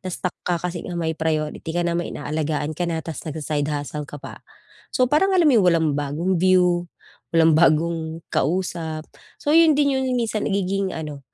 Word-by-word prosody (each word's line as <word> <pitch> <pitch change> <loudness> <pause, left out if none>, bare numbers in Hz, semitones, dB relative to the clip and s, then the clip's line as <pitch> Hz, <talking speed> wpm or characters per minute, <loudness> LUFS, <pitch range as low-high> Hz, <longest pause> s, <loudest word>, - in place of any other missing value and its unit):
na-stuck 185 -1 -3
ka 175 -1 -1
kasi 175 0 -4
nga 175 - -4
may 160 -1 -1
priority 155 -1 -2
ka 175 - +1
na, 170 - 0
may 170 0 -2
inaalagaan 150 0 -2
ka 175 +2 -2
na, 160 -2 -3
ta's 165 -3 -6
nag-sa-side 150 -1 -2
hustle 145 0 -4
ka 145 - -8
pa. 145 - -10 0.5
So, 255 - +2
parang 375 +9 +2
alam 350 - +4
mo 300 - +5
'yung 185 - +2
walang 165 -2 +3
bagong 150 +5 -1
view, 180 -1 +3 0.4
walang 165 -1 +4
bagong 160 0 +2
kausap, 160 0 -1 0.3
So, 290 - -1
'yun 320 -2 +6
din 285 -1 +3
'yung 255 -1 0
minsan 225 -3 -1
nagiging 195 -1 -1
ano, 150 -3 -6
170 Hz, 185 wpm, -22 LUFS, 155-185 Hz, 0.5 s, yun